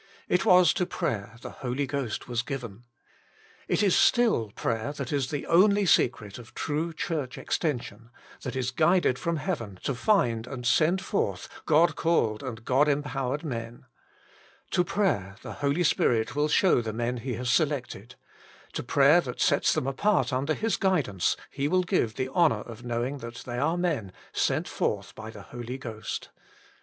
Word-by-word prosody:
It 180 - +1
was 180 -3 +6
to 180 - -1
prayer 105 0 -3
the - - -7
Holy 130 +2 -1
Ghost 135 -5 -3
was 120 -1 -1
given. 120 -4 -7 0.8
It - - +1
is 195 - +4
still 225 - +3
prayer 115 +4 -2
that 140 -2 -5
is 135 -3 0
the 145 - -3
only 200 +4 +4
secret 115 - +2
of 115 - -14
true 160 +3 -2
Church 150 -4 -3
extension, 120 - -3 0.3
that 125 -2 -5
is 130 -1 -1
guided 155 -1 +3
from 170 0 -1
heaven 115 - -4
to 140 - 0
find 125 - +1
and 125 -2 -6
send 170 +9 +3
forth 200 - -2 0.2
God 160 +2 +4
called 115 -10 +1
and 115 -4 -7
God 135 +4 +3
empowered 145 -1 -1
men. 115 -5 -6 0.9
To 180 - +3
prayer 170 - 0
the - - -6
Holy 145 +5 +1
Spirit 115 -6 +2
will 145 +1 +2
show 155 -2 +4
the 110 -2 -4
men 120 +2 -2
He 125 0 -4
has 125 +1 -1
selected; 130 - -1 0.6
to - - -2
prayer - - +5
that - - -7
sets - - +3
them - - 0
apart 145 +4 +1
under 140 +4 0
His 225 0 0
guidance 150 - +1
He 140 0 -1
will 185 +3 +2
give 170 - 0
the 130 0 -2
honour 135 -8 +3
of 115 +1 -10
knowing 120 +4 -2
that 120 0 -8
they 120 -1 -4
are 160 +6 +1
men, 145 - -1
" - - -26
sent - - 0
forth - - -2
by 110 0 -8
the 105 -3 -10
Holy 120 +4 -7
Ghost." 115 -4 -6
130 Hz, 170 wpm, -27 LUFS, 115-160 Hz, 0.9 s, was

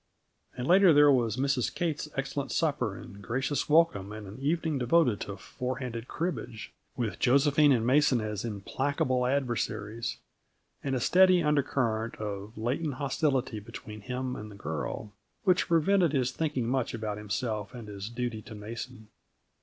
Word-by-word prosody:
And, 125 - -3
later, 185 0 +7
there 145 0 +7
was 120 -4 +2
Mrs. 135 -2 +1
Kate's 160 -3 -2
excellent 135 +1 -2
supper 140 - 0
and 100 - -11
gracious 135 +8 -1
welcome, 150 - +3
and 110 -1 -7
an 100 +5 -10
evening 155 +1 0
devoted 125 - +3
to 100 -1 -5
four 125 +6 -4
handed 120 -2 -5
cribbage 125 - -4 0.2
with 115 -4 -2
Josephine 140 +3 +4
and 115 -4 +3
Mason 135 0 +4
as 105 -2 -3
implacable 125 +4 -1
adversaries 115 -4 -2 0.7
and 135 -1 -1
a - - 0
steady 185 +5 +5
undercurrent 130 -6 0
of 105 +1 -6
latent 130 +6 -1
hostility 135 -4 0
between 105 +1 -9
him 125 +2 -3
and 105 0 -7
the 105 - -11
girl, 100 +4 -5 0.3
which 185 -2 +3
prevented 170 0 +3
his 130 -3 +1
thinking 150 -7 -1
much 130 -1 0
about 105 -2 -4
himself 105 0 -3
and 115 -3 -8
his 100 0 -6
duty 120 -2 -3
to 110 - -10
Mason. 110 +1 -8
125 Hz, 155 wpm, -29 LUFS, 110-145 Hz, 0.7 s, later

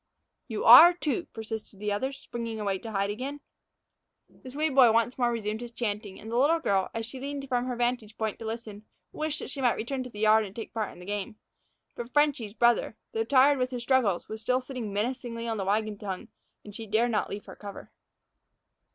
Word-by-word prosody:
"You 220 -3 -3
are, 315 +10 +11
too," 340 0 -2
persisted 220 -2 -7
the 210 0 -2
other, 260 +7 -1
springing 230 -4 -6
away 200 -2 -1
to 225 - -8
hide 200 0 0
again. 265 +7 -5 0.9
The 260 - -14
Swede 300 +2 -1
boy 255 -4 +7
once 230 +2 +2
more 240 -1 +3
resumed 220 -1 -3
his 240 -1 -7
chanting, 210 -3 -4
and 220 - -9
the 235 - 0
little 315 +5 +4
girl, 195 -11 +1
as 225 0 -2
she 255 +3 -9
leaned 280 +1 -5
from 250 -1 0
her 255 -1 -2
vantage 240 -3 -1
point 220 -2 -2
to 225 - -7
listen, 220 -2 -6 0.3
wished 310 0 -3
that - - -7
she 275 - -5
might 245 -2 +3
return 260 +4 -3
to 250 - -6
the 210 -3 -9
yard 220 0 +5
and 200 -1 -9
take 225 - -7
part 215 -2 -2
in - - -14
the 180 - -11
game. 205 +1 -4 0.6
But 240 +1 -7
"Frenchy's" 285 -8 +1
brother, 235 -2 +2
though 225 - 0
tired 275 +2 +5
with 255 0 0
his 245 -2 -5
struggles, 235 -8 +2
was 220 0 -7
still 250 +3 +1
sitting 255 -5 -6
menacingly 230 +2 -3
on 225 -1 -2
the 195 - -2
wagon 210 +1 0
tongue, 190 -3 -5 0.4
and 205 - -10
she 220 +2 -7
dared 230 +4 +2
not 215 - 0
leave 205 +1 -6
her - - -10
cover. 200 -1 -10
230 Hz, 220 wpm, -28 LUFS, 210-255 Hz, 0.9 s, are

